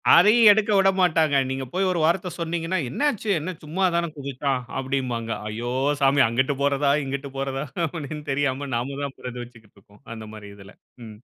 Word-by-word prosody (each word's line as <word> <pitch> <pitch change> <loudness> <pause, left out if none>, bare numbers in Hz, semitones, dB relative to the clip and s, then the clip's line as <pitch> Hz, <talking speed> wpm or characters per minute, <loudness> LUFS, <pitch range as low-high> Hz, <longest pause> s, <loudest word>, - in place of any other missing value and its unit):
அதையும் 215 +4 +7
எடுக்க 215 0 +2
விடமாட்டாங்க. 180 -6 +3
நீங்க 130 0 -3
போய் 190 +1 +1
ஒரு 175 - -1
வார்த்த 175 +2 +1
சொன்னீங்கன்னா. 170 +2 -2
"என்ன 135 - -5
ஆச்சு! 215 -1 -6
என்ன 180 +4 -4
சும்மா 180 +6 -1
தான 170 -1 0
குதிதச்சான்" 135 -1 -2 0.2
அப்டிம்பாங்க. 130 -4 -2 0.2
ஐயோ 115 +3 -4 0.3
சாமி! 140 +1 +4
அங்கிட்டு 130 +4 0
போறாதா, 140 0 +2
இங்கிட்டு 140 0 -5
போறதா 135 +1 -3 0.2
அப்படின்னு 150 -2 -6
தெரியாம 140 0 -1
நாம 135 +4 -3
தான் 140 -1 -5
பரிதவிச்சுட்டு 120 -3 -9
இருப்போம். 100 +1 -22
அந்த 110 -1 -9
மாதிரி 105 -1 -10
இதுல. 100 -1 -14 0.3
ம். 105 -1 -11
140 Hz, 165 wpm, -24 LUFS, 125-170 Hz, 0.3 s, அதையும்